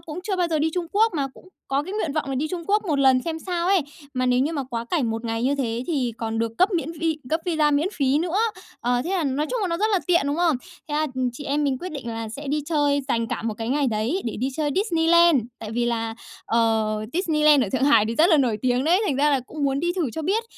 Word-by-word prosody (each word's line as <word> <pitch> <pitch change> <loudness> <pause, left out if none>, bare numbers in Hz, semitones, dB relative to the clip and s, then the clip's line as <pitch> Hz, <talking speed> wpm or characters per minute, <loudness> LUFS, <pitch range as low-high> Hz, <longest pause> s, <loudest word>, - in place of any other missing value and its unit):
cũng 330 0 -8
chưa 390 0 -2
bao 355 -2 +1
giờ 315 - 0
đi 315 +2 +1
Trung 355 -2 -2
Quốc, 435 -1 +3
mà 280 -3 0
cũng 370 - -17 0.2
có 275 +2 +1
cái 375 +5 -7
nguyện 325 -9 -1
vọng 300 -3 -2
là 270 - -2
đi 300 +4 -1
Trung 345 0 -4
Quốc 420 +1 +2
một 300 -6 0
lần 260 -2 +5
xem 325 -1 -3
sao 350 0 -2
ấy. 385 -2 +4 0.3
Mà 255 0 0
nếu 250 0 +3
như 295 +5 0
mà 285 -3 -2
quá 235 -1 -3
cảnh 255 -5 0
một 225 +1 -4
ngày 225 0 -2
như 275 +3 +2
thế 245 -3 -2
thì 265 -8 -1
còn 225 -1 -3
được 230 0 -1
cấp 370 - +5
miễn 330 -2 -1
vi 325 -1 -1
cấp 320 - +1
visa 310 -3 +2
miễn 295 +5 +2
phí 275 0 +1
nữa. 345 +3 -1 0.4
Ờ, 245 +1 +1
thế 355 - -3
là 365 -5 0
nói 280 +3 0
chung - - -1
là 390 - 0
nó 335 - -1
rất 430 +3 +1
là 390 - +4
tiện, 345 -3 +4
đúng 285 - 0
không? 335 -5 +2 0.3
Thế 295 - -3
là 310 +1 +1 0.3
chị 285 +4 -9
em 290 +1 0
mình 270 -2 0
quyết 365 -2 -6
định 270 -5 -6
là 225 -1 -4
sẽ 280 +7 -8
đi 295 +2 0
chơi, 290 -3 +2
dành 230 -3 0
cả - - -4
một 225 -1 -2
cái 225 +1 -5
ngày 280 +2 +1
đấy 235 - -1
để 230 - -3
đi 260 - 0
chơi 300 -2 0
Disneyland, 340 - +4 0.2
tại 215 -1 -7
vì 240 +1 0
là, 225 -1 -2 0.3
ờ, 225 -2 +1 0.2
Disneyland 305 -5 +3
ở 200 - -4
Thượng 260 +1 +1
Hải 230 -7 +5
thì 230 - -2
rất 315 +7 +5
là 320 - +6
nổi 245 -7 +1
tiếng 250 +1 +1
đấy, 355 +5 +4
thành 280 - 0
ra 295 +2 +3
là 275 -3 +2
cũng 290 +4 -5
muốn 275 0 +1
đi 345 +2 0
thử 340 -9 -1
cho 320 - -5
biết. 405 +8 0
290 Hz, 290 wpm, -24 LUFS, 245-335 Hz, 0.4 s, là